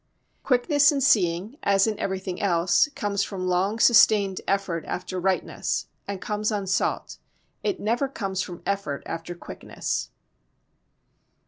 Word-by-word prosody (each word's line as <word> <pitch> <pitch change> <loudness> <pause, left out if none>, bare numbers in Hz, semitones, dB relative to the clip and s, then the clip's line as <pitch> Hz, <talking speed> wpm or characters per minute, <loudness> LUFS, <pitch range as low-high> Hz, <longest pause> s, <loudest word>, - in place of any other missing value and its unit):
Quickness 285 +3 +3
in 285 - 0
seeing 200 -2 +2
as 195 -1 +3
in 220 -2 -2
everything 190 -1 -3
else 175 - +3
comes 200 -1 -1
from 185 -3 -4
long 185 +4 +1
sustained 215 -4 +5
effort 195 -4 -1
after 185 0 -4
rightness 190 +1 -1 0.2
and 200 -1 -4
comes 210 +2 -2
unsought. 195 -2 -1 0.4
It 405 -3 -1
never 235 +6 0
comes 195 -7 -3
from 180 -3 -7
effort 195 -8 -2
after 165 +1 -5
quickness. - - -5
195 Hz, 125 wpm, -25 LUFS, 185-220 Hz, 0.4 s, sustained